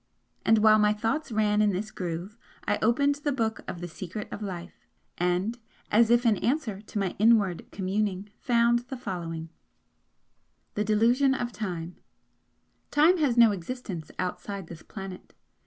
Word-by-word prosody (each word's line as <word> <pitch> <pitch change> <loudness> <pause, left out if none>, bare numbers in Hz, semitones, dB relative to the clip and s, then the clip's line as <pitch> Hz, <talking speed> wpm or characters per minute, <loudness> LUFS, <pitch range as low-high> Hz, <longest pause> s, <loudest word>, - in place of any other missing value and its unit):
And 225 - +5
while 215 0 +6
my 210 0 +4
thoughts 225 +7 -2
ran 210 -1 +2
in 210 - +4
this 210 +4 -3
groove, 180 +3 -5 0.3
I - - +1
opened 280 +5 +2
the 290 - +1
book 225 -4 -1
of 175 - -6
the 175 - -4
'Secret 185 +4 -7
of - - -6
Life' 180 -3 -7 0.3
and 180 +7 0 0.3
as 225 +2 +5
if 240 +1 +4
in 220 -3 +4
answer 235 -6 -1
to 210 - -8
my 195 -3 -1
inward 210 -5 +3
communing, 200 +1 -2
found 235 -1 +3
the 265 - -4
following: 170 -8 -5 1.2
THE 210 - 0
DELUSION 240 +6 +3
OF 240 -2 -3
TIME 175 -6 -5 0.9
"Time 330 +5 +4
has 265 -6 +2
no 230 -2 +7
existence 190 -4 -5
outside 195 +1 -4
this 165 -1 -10
planet. 195 -3 -9
210 Hz, 155 wpm, -27 LUFS, 185-235 Hz, 1.2 s, no